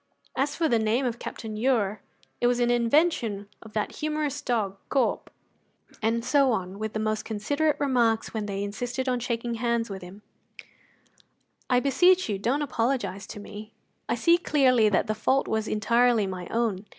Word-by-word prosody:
As 275 +2 0
for 330 - +1
the 235 -5 +2
name 230 +3 +1
Captain 225 -1 -7
Ure, 215 -4 +1 0.4
it 240 - +4
was 245 0 +2
an 240 0 +2
invention 235 - +1
of 220 -1 -13
that 210 -1 -2
humourous 300 -2 -2
dog, 210 -6 -1
Corp." 275 - 0 0.7
And 230 +1 0
so 270 +1 +4
on, 190 -1 -4
with 215 0 -3
the 215 - -2
most 215 0 -1
considerate 285 +8 0
remarks 240 -5 +1
when 215 -2 -3
they 200 0 -3
insisted 245 +6 -3
on 250 -1 +1
shaking 235 0 -2
hands 235 -2 0
with 190 -1 -6
him: 185 +4 -12 1.5
"I 250 -1 +4
beseech 355 +8 +4
you, 200 -2 -1
don't 265 +8 0
apologize 230 -7 -1
to - - -8
me; 210 +1 -10 0.4
I - - +2
see 340 0 +4
clearly 255 - +3
that 195 - +2
the 215 - -1
fault 260 +5 +1
was 220 0 -1
entirely 230 +1 +3
my 185 -2 -5
own. 220 -4 -1
230 Hz, 170 wpm, -26 LUFS, 210-260 Hz, 1.5 s, it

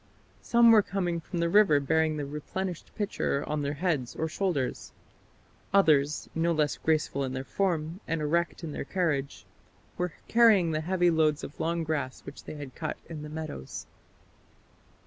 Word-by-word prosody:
Some 235 -1 +5
were 220 -2 +7
coming 180 -4 -2
from 175 +2 -6
the 170 0 +1
river 180 -5 +5
bearing 160 +2 +1
the 145 - -3
replenished 165 +5 -5
pitcher 200 -8 -1
on 150 0 -1
their 145 +1 -2
heads 150 -7 -1
or 160 - -1
shoulders; 160 -6 -2 0.8
others, 150 -6 +3
no 165 +1 +1
less 150 -2 +1
graceful 155 -3 0
in 130 -1 -3
their 130 0 -3
form, 170 0 -1
and 165 0 -1
erect 170 +3 0
in 160 - -4
their - - -4
carriage, 145 -4 -2 0.5
were 180 -2 -1
carrying 220 -8 +5
the 155 0 -1
heavy 175 +1 +2
loads 155 -2 +2
of 145 - -8
long 170 0 0
grass 145 -5 -3
which 140 - -11
they - - -7
had 145 -3 -8
cut 155 -2 -4
in 160 -3 -6
the 150 - -7
meadows." 155 - -6
160 Hz, 165 wpm, -28 LUFS, 145-175 Hz, 0.8 s, were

